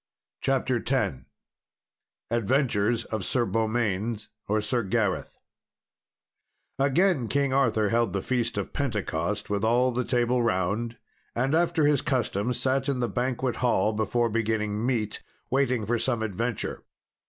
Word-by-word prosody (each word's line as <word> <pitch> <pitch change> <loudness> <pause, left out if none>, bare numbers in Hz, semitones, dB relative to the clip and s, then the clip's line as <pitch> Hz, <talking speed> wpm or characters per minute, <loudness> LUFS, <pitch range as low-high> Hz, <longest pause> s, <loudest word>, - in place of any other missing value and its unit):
CHAPTER 130 -2 +1
X 95 - 0 1.1
Adventures 115 -1 +1
of 110 -3 -3
Sir 120 +3 +1
Beaumains 110 -1 -1 0.2
or 105 +1 +2
Sir 120 +3 0
Gareth 100 -2 -1 1.4
Again 140 0 +3
King 140 +2 +1
Arthur 115 -6 +2
held 115 +1 +2
the 100 - -2
Feast 120 -3 -1
of 100 - -3
Pentecost, 105 - -2
with 100 0 0
all 120 +3 +3
the 125 +1 -1
Table 120 0 +1
Round, 110 +3 0 0.4
and 130 +4 +1
after 165 -1 +3
his 145 -2 +3
custom 120 -4 0
sat 135 +2 0
in 135 -2 0
the 120 - +1
banquet 125 0 -1
hall, 110 -4 +2
before 115 +2 0
beginning 110 -1 0
meat, 115 -4 -1 0.3
waiting 130 -4 +1
for 120 +2 0
some 115 -1 0
adventure. 115 +3 -3
120 Hz, 130 wpm, -27 LUFS, 105-130 Hz, 1.4 s, Again